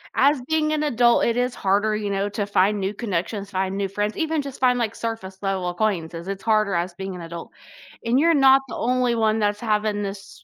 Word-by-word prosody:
as 280 -1 +3
being 310 -1 +1
an 305 0 0
adult, 240 -4 +3
it 235 0 +1
is 250 0 0
harder, 205 +2 +1
you 210 -1 -3
know, 200 +1 -1
to 205 0 -2
find 205 +1 +2
new 195 +1 -2
connections, 200 -1 -3
find 190 0 -2
new 200 - -1
friends, 205 +2 -3
even 320 -2 0
just 275 -1 -8
find, 250 -1 +3
like, 230 -2 -2
surface-level 195 -4 -3
acquaintances, 175 -3 -2
it's 195 0 -5
harder 215 -3 +2
as 175 +1 -1
being 190 0 -6
an 180 - -8
adult, 170 0 -8 0.5
and 240 +3 +3
you're 335 +3 +4
not 270 -2 +6
the - - -7
only 250 0 +1
one 220 -1 +1
that's 205 0 0
having 210 -2 0
this 195 -1 -8
210 Hz, 215 wpm, -23 LUFS, 195-240 Hz, 0.5 s, not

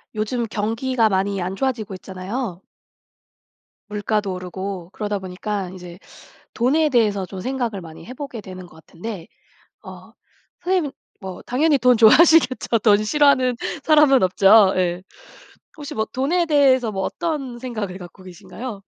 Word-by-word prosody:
요즘 230 +3 -2
경기가 225 +3 0
많이 195 0 0
안 185 +2 -3
좋아지고 225 -4 -2
있잖아요. 190 +2 -6 1.3
물가도 210 -1 -2
오르고 185 0 -6
그러다 205 -1 -3
보니까 190 +1 -5
이제 180 -1 -11 0.5
돈에 295 +6 +2
대해서 210 -6 +1
좀 185 0 -8
생각을 240 -6 -3
많이 160 -1 -12
해 250 - -9
보게 260 -4 -7
되는 185 -2 -10
것 - - -19
같은데 170 +3 -9 0.6
어 - - -12 0.5
선생님은 355 -6 0 0.3
뭐 190 -2 -8
당연히 285 +3 +2
돈 250 -1 +4
좋아하시겠죠? 255 +1 +5
돈 210 -1 +4
싫어하는 260 -2 +3 0.3
사람은 300 -5 +5
없죠. 195 +2 +5
예. 180 0 -1 0.7
혹시 290 -2 -8
뭐 220 - 0
돈에 335 +7 0
대해서 265 -7 +3
뭐 190 -1 -3
어떤 290 -8 -4
생각을 215 -7 -5
갖고 180 +1 -12
계신가요? 200 +4 -9
215 Hz, 305 characters per minute, -21 LUFS, 190-260 Hz, 1.3 s, 좋아하시겠죠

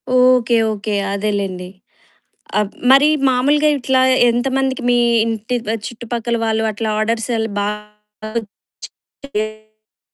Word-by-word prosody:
Okay. 250 -2 +4 0.2
Okay. 210 0 -4 0.2
అదేలెండి.అబ్ 195 -2 -5 0.9
మరి 275 +2 +6 0.2
మామూలుగా 285 +4 +2
ఇట్లా 260 0 +1 0.3
ఎంతమందికి 265 +2 -1
మీ 245 - +3 0.3
ఇంటి 225 +2 -2 0.3
చుట్టుపక్కల 235 0 -4
వాళ్ళు 220 0 0
అట్లా 220 +2 -3
ఆర్డర్స్ 225 +2 -1
ఎలా 225 0 -2
బాగా 210 +1 -7 0.8
వచ్చాయా? 215 -3 -8
225 Hz, 95 wpm, -18 LUFS, 210-250 Hz, 0.9 s, మరి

